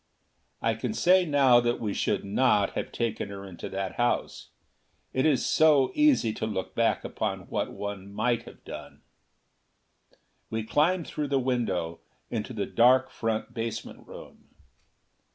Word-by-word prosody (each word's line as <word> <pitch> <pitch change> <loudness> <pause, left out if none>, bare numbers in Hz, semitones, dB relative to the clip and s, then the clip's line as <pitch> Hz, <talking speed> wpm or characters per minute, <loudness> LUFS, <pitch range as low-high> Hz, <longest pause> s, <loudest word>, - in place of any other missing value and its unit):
I 115 - +2
can 115 - -4
say 185 -1 +4
now 135 -5 +5
that 120 0 0
we 105 -3 -2
should - - -1
not 105 -1 +2
have - - -4
taken 110 -3 -2
her 100 0 -8
into 90 -3 -8
that 95 -1 -4
house. 120 0 -1 0.6
It 130 +4 +2
is 145 -4 +2
so 150 -4 +4
easy 290 - +3
to 110 - -3
look 95 -4 -4
back - - +1
upon - - -3
what - - -2
one 100 -1 -6
might 115 +3 0
have - - -14
done! - - -9 1.5
We 110 0 -2
climbed 160 +9 +1
through 150 -1 -3
the 140 0 +1
window, 105 -11 -1 0.3
into 115 +1 -3
the 105 -4 -2
dark 125 +6 +4
front 110 0 -3
basement 115 -1 -5
room. - - -12
115 Hz, 150 wpm, -27 LUFS, 105-130 Hz, 1.5 s, now